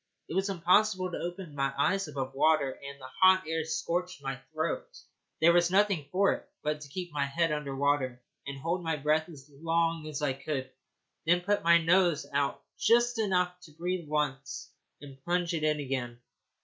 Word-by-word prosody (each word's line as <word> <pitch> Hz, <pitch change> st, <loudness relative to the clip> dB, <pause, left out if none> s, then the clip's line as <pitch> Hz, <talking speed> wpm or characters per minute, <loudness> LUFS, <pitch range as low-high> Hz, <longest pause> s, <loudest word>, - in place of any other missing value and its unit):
It -, -, -6 dB
was 190 Hz, +2 st, +1 dB
impossible 185 Hz, +1 st, +2 dB
to -, -, -4 dB
open 175 Hz, -2 st, -6 dB
my 135 Hz, -1 st, 0 dB
eyes 195 Hz, +6 st, +1 dB
above 135 Hz, -3 st, -4 dB
water, 145 Hz, -1 st, +3 dB
and 140 Hz, 0 st, -8 dB
the 130 Hz, -, -10 dB, 0.2 s
hot 185 Hz, 0 st, +7 dB
air 160 Hz, 0 st, -1 dB
scorched 175 Hz, +1 st, -2 dB
my 135 Hz, -1 st, -3 dB
throat. 160 Hz, -, -2 dB, 0.5 s
There 170 Hz, +2 st, +6 dB
was 175 Hz, 0 st, +4 dB
nothing 190 Hz, -6 st, +2 dB
for 195 Hz, +2 st, +3 dB
it -, -, -9 dB
but 150 Hz, 0 st, -1 dB
to 145 Hz, -, -10 dB
keep 175 Hz, +3 st, -5 dB
my 145 Hz, -1 st, +1 dB
head 165 Hz, +3 st, +1 dB
under 150 Hz, -2 st, -3 dB
water 135 Hz, -3 st, +1 dB, 0.3 s
and 140 Hz, 0 st, -5 dB
hold 170 Hz, +5 st, -2 dB
my 165 Hz, -1 st, 0 dB
breath 155 Hz, +3 st, +1 dB
as 140 Hz, -4 st, -12 dB
long 165 Hz, +2 st, -1 dB
as 150 Hz, -1 st, -4 dB
I 140 Hz, -3 st, +2 dB
could, 135 Hz, -1 st, -4 dB, 0.6 s
then 175 Hz, +1 st, +4 dB
put 205 Hz, +3 st, +1 dB
my 170 Hz, 0 st, +6 dB
nose 170 Hz, -1 st, +3 dB
out 140 Hz, 0 st, 0 dB, 0.2 s
just 240 Hz, +1 st, +3 dB
enough 180 Hz, -4 st, +1 dB
to 155 Hz, -, -16 dB
breathe 175 Hz, +1 st, -3 dB
once, 135 Hz, -3 st, -2 dB, 0.3 s
and 135 Hz, -2 st, -12 dB
plunge 175 Hz, 0 st, 0 dB
it 160 Hz, -2 st, -2 dB
in 150 Hz, -1 st, +2 dB
again. 130 Hz, -4 st, -3 dB
160 Hz, 190 wpm, -30 LUFS, 140-180 Hz, 0.6 s, hot